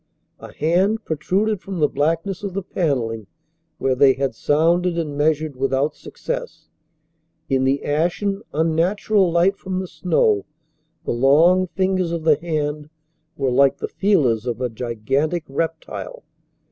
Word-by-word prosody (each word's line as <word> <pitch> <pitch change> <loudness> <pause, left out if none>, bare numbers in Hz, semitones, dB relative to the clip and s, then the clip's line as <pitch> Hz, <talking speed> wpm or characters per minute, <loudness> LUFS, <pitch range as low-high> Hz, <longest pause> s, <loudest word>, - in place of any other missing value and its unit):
A - - -11
hand 190 +8 +1
protruded 190 +6 0
from 195 -2 -6
the 150 - +4
blackness 165 +7 -1
of 200 -3 -5
the 195 - -2
panelling 120 - -2 0.5
where 135 - +1
they 135 +1 +5
had 135 -2 -2
sounded 170 +7 +1
and 155 -4 -3
measured 155 0 0
without 135 +3 0
success. - - -6 0.8
In 130 -1 +2
the 135 +1 0
ashen, 175 +7 0
unnatural 175 +5 +1
light 175 +4 +2
from 185 -1 -4
the 190 - -3
snow 135 - +1 0.6
the - - -1
long 160 +9 +4
fingers 185 -1 0
of 170 -2 -3
the 155 -2 +4
hand 150 -2 -3 0.5
were 135 -2 0
like 140 +2 +4
the - - -4
feelers 135 - +1
of 120 -1 -2
a 125 -1 -1
gigantic 130 +8 -2
reptile. 165 - -4
160 Hz, 140 wpm, -21 LUFS, 135-185 Hz, 0.8 s, they